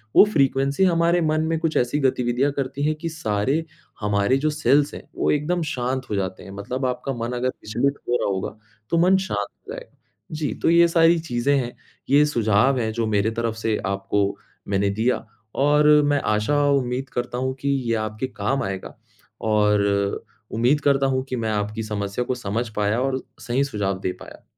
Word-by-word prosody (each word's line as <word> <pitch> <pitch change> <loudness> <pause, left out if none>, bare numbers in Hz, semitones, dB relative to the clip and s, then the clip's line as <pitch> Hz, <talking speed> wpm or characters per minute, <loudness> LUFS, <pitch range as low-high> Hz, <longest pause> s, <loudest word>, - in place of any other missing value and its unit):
वो - - +10
फ़्रीक्वेंसी 140 +4 +2
हमारे 170 -1 +3
मन 155 0 +1
में 165 0 0
कुछ 165 -1 -1
ऐसी 125 +4 +1
गतिविधियाँ 130 0 +1
करती 140 0 -3
है 155 +1 +2
कि 165 - -2
सारे 135 0 -1 0.4
हमारे 105 +5 +2
जो 155 +2 0
सेल्स 150 -1 +2
हैं, - - -7
वो - - +1
एकदम 165 +4 0
शांत 130 +1 -2
हो 105 - -1
जाते 95 -1 -3
हैं। 95 - -10
मतलब 125 +7 -4
आपका 125 +2 -2
मन 120 0 -4
अगर 130 +1 0
विचलित 130 +5 -1
हो 120 - +3
रहा - - 0
होगा, 95 +1 -3 0.3
तो 170 - +1
मन 185 +2 +5
शांत 190 0 -2
हो 445 +3 -11
जाएगा। - - -11 0.3
जी, 155 -1 -2
तो - - 0
ये 170 0 +6
सारी 165 0 +4
चीज़ें 140 -2 0
हैं, 120 -2 -3 0.3
ये 145 +2 +6
सुझाव 120 -1 +2
है 110 -2 -1
जो 115 0 -1
मेरे 105 +1 +1
तरफ़ 115 0 -2
से 110 -1 0
आपको 100 +1 -1 0.3
मैंने 100 0 +1
दिया, 110 +5 0 0.3
और 150 +2 +4 0.2
मैं 145 -1 +2
आशा 105 +7 +1
और 140 -1 +3
उम्मीद 125 +2 -3
करता 120 0 -3
हूँ 130 +1 -1
कि 140 - -1
ये 125 -4 0
आपके 110 +5 -4
काम 130 +3 -2
आएगा 95 -1 -5 0.5
और 100 -1 +2 0.3
उम्मीद 120 +6 +2
करता 135 -1 +3
हूँ 130 0 0
कि 130 - -2
मैं 110 -1 -2
आपकी 105 +1 -2
समस्या 100 +2 -3
को 130 - -1
समझ 115 +1 -3
पाया 105 +3 +1
और 130 0 -1 0.2
सही 125 +3 0
सुझाव 100 -8 -2
दे 95 - -2
पाया। - - -12
125 Hz, 195 wpm, -23 LUFS, 105-145 Hz, 0.5 s, वो